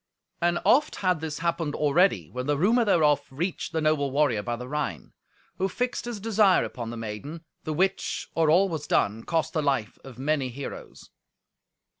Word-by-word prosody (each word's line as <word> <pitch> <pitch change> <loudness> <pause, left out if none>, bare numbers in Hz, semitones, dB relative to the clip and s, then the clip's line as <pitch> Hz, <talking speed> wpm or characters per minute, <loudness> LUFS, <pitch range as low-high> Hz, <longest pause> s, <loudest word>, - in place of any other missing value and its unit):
And 175 0 +2
oft 300 +3 +4
had 180 -4 +2
this 155 -2 -4
happened 165 -3 -1
already, 160 +6 +2
when 125 +1 -4
the 145 -1 +1
rumour 225 - +3
thereof 155 -8 +3
reached 165 +7 -3
the 160 - -1
noble 155 -2 +2
warrior 135 -6 +2
by 120 +3 -3
the 125 +1 -8
Rhine, 145 - -4 0.5
who 190 +1 +1
fixed 245 +6 -2
his 240 -3 -5
desire 210 -2 +3
upon 115 -2 -5
the 120 - -6
maiden, 115 +9 -6 0.2
the 155 - -2
which, 190 +5 -1
or 160 -2 +2
all 180 +5 +5
was 160 -5 -5
done, 110 +3 +1
cost 165 -2 -1
the 155 - +1
life 135 -7 -1
of 130 -3 -11
many 140 0 0
heroes. 135 +3 -9
155 Hz, 180 wpm, -26 LUFS, 135-175 Hz, 0.5 s, all